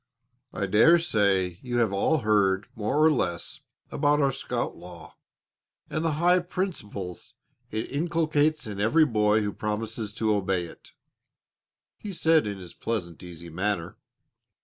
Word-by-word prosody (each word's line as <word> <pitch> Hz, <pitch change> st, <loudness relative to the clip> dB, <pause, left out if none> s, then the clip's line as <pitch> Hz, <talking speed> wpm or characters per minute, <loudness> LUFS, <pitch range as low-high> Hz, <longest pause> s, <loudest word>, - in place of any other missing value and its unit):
"I -, -, -2 dB
dare 110 Hz, -, +6 dB
say 100 Hz, -, +1 dB
you 120 Hz, -1 st, -3 dB
have 115 Hz, -4 st, +2 dB
all 145 Hz, +9 st, +1 dB
heard 100 Hz, -2 st, +2 dB
more 135 Hz, +8 st, +1 dB
or 160 Hz, -, +6 dB
less 90 Hz, -, -2 dB, 0.3 s
about 145 Hz, 0 st, +2 dB
our 140 Hz, -2 st, +3 dB
scout -, -, -3 dB
law 85 Hz, -3 st, -12 dB, 0.8 s
and 155 Hz, -, -1 dB
the 165 Hz, -2 st, +1 dB
high 175 Hz, +4 st, +3 dB
principles 160 Hz, -, -5 dB, 0.3 s
it 110 Hz, +1 st, -4 dB
inculcates 155 Hz, 0 st, +1 dB
in 105 Hz, -2 st, -6 dB
every 150 Hz, +10 st, +4 dB
boy 105 Hz, -4 st, +2 dB
who 105 Hz, -1 st, -2 dB
promises 110 Hz, 0 st, -4 dB
to 110 Hz, -1 st, +1 dB
obey 95 Hz, -3 st, 0 dB
it," -, -, -14 dB, 1.1 s
he 205 Hz, -2 st, -6 dB
said 160 Hz, -, +3 dB
in 100 Hz, -1 st, -4 dB
his 90 Hz, -3 st, -10 dB
pleasant, 90 Hz, -8 st, -4 dB
easy 85 Hz, -1 st, -10 dB
manner. 95 Hz, +1 st, -2 dB
110 Hz, 145 wpm, -26 LUFS, 95-150 Hz, 1.1 s, dare